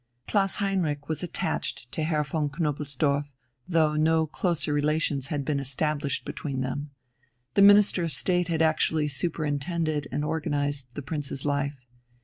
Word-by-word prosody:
Klaus 195 -2 +2
Heinrich 170 -8 -1
was 160 -2 -2
attached 150 -7 -3
to - - -3
Herr 155 -1 +1
von 150 +1 -1
Knobelsdorff, 145 -2 0 0.4
though 160 -3 +3
no 160 +1 +3
closer 155 -1 -1
relations 145 -2 +1
had 145 -3 -2
been 145 -1 0
established 140 +1 -1
between 135 -3 -3
them. 140 +3 -3 0.6
The 200 - +4
Minister 205 -2 +7
of 165 - -2
State 180 +1 +1
had 165 -2 +1
actually 155 -1 +2
superintended 155 +1 -1
and 150 - -1
organized 145 -3 -1
the 145 - -5
Prince's 145 -1 -4
life. 140 0 0
150 Hz, 140 wpm, -27 LUFS, 145-160 Hz, 0.6 s, Minister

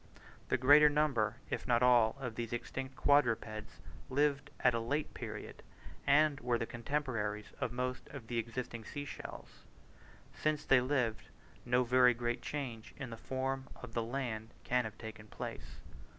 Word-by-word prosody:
The - - +3
greater 145 +4 +8
number, 140 -8 +2 0.2
if - - -2
not 120 0 +4
all, 120 -3 +5
of 125 -4 -4
these 115 0 -4
extinct 130 +2 -4
quadrupeds 115 -7 +1 0.3
lived 140 0 +1
at 125 - +4
a 115 - +1
late 145 +7 -2
period, - - -7 0.5
and 145 0 +5
were 120 -2 +1
the 115 - -2
contemporaries 115 -5 -2
of 120 - 0
most 125 +1 -3
of 140 -5 -9
the 115 0 -1
existing 115 0 -4
sea 145 +6 -5
shells. - - -9 0.7
Since 155 -1 -1
they 130 -2 +6
lived, 125 -4 0 0.4
no 125 +1 +3
very 125 0 +5
great 120 +1 -2
change 125 -7 -5
in 130 -4 -6
the - - -4
form 130 +2 -3
of 115 - -10
the 120 - 0
land 115 -2 -4
can 125 -1 +1
have 110 -1 -7
taken 110 -1 -9
place. - - -7
125 Hz, 160 wpm, -34 LUFS, 115-135 Hz, 0.7 s, greater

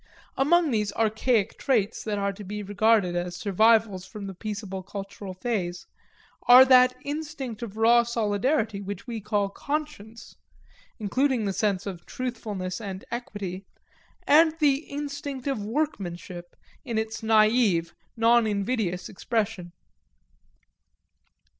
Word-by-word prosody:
Among 325 +2 +3
these 210 -3 0
archaic 220 -1 +1
traits 225 -5 0
that 210 -2 -2
are 200 0 -1
to 205 - -10
be 210 +2 -5
regarded 205 -2 +2
as 175 0 -3
survivals 215 0 +3
from 200 +2 -9
the 195 - -6
peaceable 200 -1 -5
cultural 195 0 -8
phase, 185 -4 -3 0.6
are 250 +2 +10
that 255 -1 +6
instinct 285 -6 -5
of 220 -3 -7
race 235 +1 +4
solidarity 220 0 0
which 200 -1 -6
we 230 -3 -5
call 205 -1 0
conscience, 235 -4 -5 0.6
including 245 +2 0
the 195 - -1
sense 200 -2 0
of 180 -4 -7
truthfulness 210 -7 -4
and 195 -3 -6
equity, 205 -6 -5 0.6
and 315 +2 +5
the 290 -4 +3
instinct 285 -2 -5
of 270 -7 -2
workmanship, 185 - -4 0.3
in 235 -4 -3
its 220 0 -3
naive, 215 -6 +3 0.2
non 230 0 +4
invidious 200 -3 -1
expression. 205 -4 -3
215 Hz, 120 wpm, -26 LUFS, 195-245 Hz, 0.6 s, are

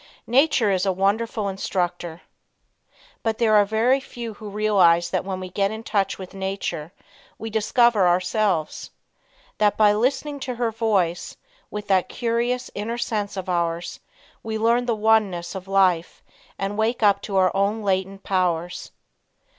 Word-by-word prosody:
Nature 250 -4 +3
is 185 -1 +1
a 195 - +2
Wonderful 205 +3 0
Instructor. 175 -3 -3 1.0
But 225 -1 -1
there 225 -2 +2
are 205 -1 +6
very 225 +6 +2
few 235 -4 -7
who 210 0 -9
realize 185 -5 +3
that - - 0
when 190 -1 -4
we 185 -1 -7
get 195 +1 +1
in 220 +1 -7
touch 200 -3 0
with 185 -1 -9
nature 190 -5 -4 0.5
we 225 0 -6
discover 220 -2 +3
ourselves. 180 -1 0 0.7
That 210 -1 +3
by 210 -1 +5
listening 270 +6 -1
to 255 -2 -4
her 235 -1 -1
voice, 200 -7 -1 0.3
with 210 0 -6
that 190 -2 +2
curious, 240 +1 -1
inner 225 +3 -4
sense 210 -4 -3
of 190 - -5
ours, 170 -1 -2 0.4
we 220 0 -4
learn 235 +3 +2
the 235 - +1
oneness 210 -5 +1
of 190 -1 -7
life 185 -4 +1 0.3
and 200 +2 -3
wake 225 +1 0
up 200 -1 +4
to 200 -1 -3
our 185 0 +3
own 205 +3 0
latent 195 0 -1
powers. 180 -2 -1
205 Hz, 155 wpm, -23 LUFS, 185-225 Hz, 1.0 s, are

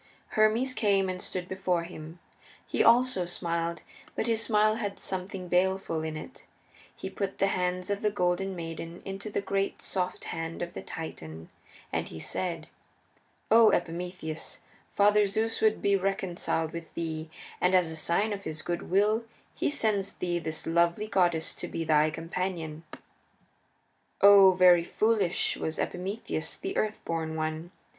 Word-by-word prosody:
Hermes 220 +4 +2
came 200 -4 +2
and 185 0 -4
stood 180 -1 -4
before 185 -2 0
him. 160 -1 -9 0.5
He - - +1
also 235 -6 +4
smiled, 170 -1 -2 0.3
but - - -1
his 225 -1 +1
smile 215 -1 +3
had 205 -3 -4
something 185 0 -4
baleful 180 -2 +1
in 155 -1 -4
it. 255 - -10 0.5
He - - -6
put 195 0 -4
the - - +3
hands 180 +1 -1
of 200 - -1
the 210 - +2
Golden 190 -1 0
Maid 165 -2 -5
into 195 +5 -7
the 205 - -1
great 195 0 -1
soft 185 -1 -3
hand 165 +1 -4
of 175 - -6
the - - -6
Titan, 80 - -8 0.4
and - - -1
he 80 - -8
said, 165 - -3 0.8
"O 225 0 +8
Epimetheus, 175 -2 -3 0.3
Father 205 0 +5
Zeus 220 +3 -1
would 220 0 +2
be 200 0 +4
reconciled 185 -4 -1
with 170 -1 -7
thee, 160 -1 -4 0.3
and 180 +1 +4
as 175 -3 +3
a - - -5
sign 175 +7 +1
of 200 -1 -6
his 155 0 -5
good 175 0 -3
will 210 +5 +3 0.3
he - - 0
sends 210 -8 +1
thee 175 -1 -2
this 160 -1 -4
lovely 170 +4 +2
goddess 175 -6 +1
to - - -6
be 165 - -3
thy 155 -1 +4
companion." 165 -1 -4 1.4
Oh, 200 -1 +8
very 180 -2 +6
foolish 210 -1 +1
was 160 - -3
Epimetheus 185 -2 -3
the 385 +1 -4
Earth 215 0 0
born 160 -1 -2
One! 155 +1 -3
180 Hz, 155 wpm, -29 LUFS, 165-200 Hz, 1.4 s, O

